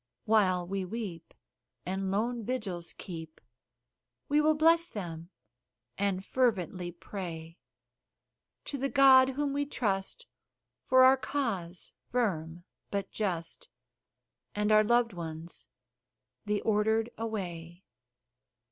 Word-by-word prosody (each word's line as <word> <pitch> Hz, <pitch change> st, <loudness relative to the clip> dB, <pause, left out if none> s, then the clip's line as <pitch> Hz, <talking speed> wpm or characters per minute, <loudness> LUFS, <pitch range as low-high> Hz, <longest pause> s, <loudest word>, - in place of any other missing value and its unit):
While 185 Hz, -5 st, +3 dB
we 195 Hz, +2 st, -3 dB
weep, 185 Hz, -4 st, -6 dB, 0.5 s
and 190 Hz, +1 st, -2 dB
lone 230 Hz, +4 st, -1 dB
vigils 200 Hz, -8 st, -3 dB
keep, 160 Hz, -4 st, -9 dB, 0.9 s
We 295 Hz, +1 st, +4 dB
will 310 Hz, +1 st, +4 dB
bless 330 Hz, +2 st, +4 dB
them, 170 Hz, -4 st, -6 dB, 0.7 s
and 195 Hz, 0 st, -1 dB
fervently 185 Hz, -8 st, 0 dB
pray 170 Hz, -2 st, -7 dB, 1.1 s
To 280 Hz, -, -4 dB
the 275 Hz, +1 st, 0 dB
God 265 Hz, -1 st, +7 dB
whom 280 Hz, +1 st, -1 dB
we 285 Hz, 0 st, -1 dB
trust, 210 Hz, -, -2 dB, 0.6 s
for 260 Hz, 0 st, +6 dB
our 260 Hz, +1 st, +7 dB
cause 205 Hz, -12 st, -3 dB, 0.2 s
firm 175 Hz, -8 st, -1 dB, 0.3 s
but 200 Hz, -1 st, -3 dB
just, 175 Hz, -6 st, -3 dB, 0.9 s
And 210 Hz, +1 st, +1 dB
our 215 Hz, 0 st, +7 dB
loved 235 Hz, 0 st, +2 dB
ones 165 Hz, -1 st, -7 dB, 0.8 s
the 210 Hz, -1 st, 0 dB
Ordered 220 Hz, +2 st, +1 dB
away. 180 Hz, -6 st, -5 dB
205 Hz, 105 wpm, -30 LUFS, 175-245 Hz, 1.1 s, God